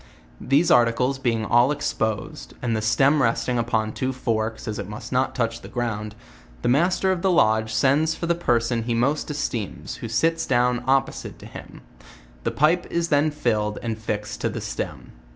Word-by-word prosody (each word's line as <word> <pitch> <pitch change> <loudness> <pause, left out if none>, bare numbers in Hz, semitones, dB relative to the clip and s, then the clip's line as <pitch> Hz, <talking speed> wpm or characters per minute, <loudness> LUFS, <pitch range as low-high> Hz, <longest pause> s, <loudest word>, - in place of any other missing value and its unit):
These 145 +6 +3
articles 125 +3 +3
being 115 -4 0
all 120 +5 +4
exposed, 110 -7 -3
and 120 -2 -1
the - - 0
Blem 135 +7 +3
resting 120 0 +1
upon 110 -2 0
two 130 0 -2
forks, 115 -3 -2
as 105 -1 -3
it 100 -1 -5
must 105 +2 -8
not 130 +1 0
touch 115 -2 -1
the - - -10
ground, 110 -3 -3 0.5
the - - +1
master 175 +8 +2
of 185 -2 -1
the 190 - +2
lodge 110 -10 +3
sends 145 +7 +2
for - - -4
the 170 - +2
person 120 -7 +1
he 115 +1 -1
most 140 +7 0
esteems, 120 -8 -4
who 115 - -6
sits 165 +10 +1
down 125 -1 +2
opposite 135 0 0
to - - -13
him, - - -11 0.6
the - - 0
pipe 165 +5 +2
is 170 0 -1
then 150 +1 +3
filled 110 -8 -1
and 115 -2 -3
fix 105 -1 -3
ed - - -13
to - - 0
the - - -5
stem. - - -5
120 Hz, 190 wpm, -24 LUFS, 110-145 Hz, 0.6 s, all